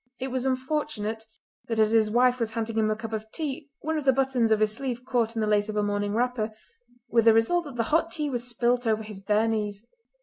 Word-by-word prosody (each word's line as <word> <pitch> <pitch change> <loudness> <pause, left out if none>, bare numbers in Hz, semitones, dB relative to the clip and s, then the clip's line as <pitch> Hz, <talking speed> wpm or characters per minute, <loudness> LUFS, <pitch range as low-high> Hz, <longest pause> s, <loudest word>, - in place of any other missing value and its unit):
It 265 - -3
was 260 0 -1
unfortunate 255 -5 -2 0.4
that 225 - -2
as 215 0 +4
his 220 -1 +4
wife 250 +2 +3
was 225 -2 -1
handing 225 0 -1
him 215 -1 +2
a 215 - +1
cup 225 0 -7
of 220 0 -5
tea 300 -2 -4
one 315 0 -1
of 290 - -7
the 265 - +6
buttons 260 -3 +1
of 215 - +4
his 215 0 +2
sleeve 250 0 -4
caught 235 -3 0
in 225 - -1
the 215 - 0
lace 210 0 +2
of 215 - -4
her 210 - +1
morning 205 0 -1
wrapper, 235 -2 0 0.6
with 230 -1 +2
the 225 - +8
result 320 +11 +2
that 280 -4 -8
the 230 - +1
hot 330 +1 +3
tea 300 -3 -1
was 245 -4 -2
spilt 245 0 +1
over 220 0 +1
his 210 -2 -7
bare 210 +3 +1
knees. 210 -1 -2
230 Hz, 245 wpm, -26 LUFS, 215-260 Hz, 0.6 s, the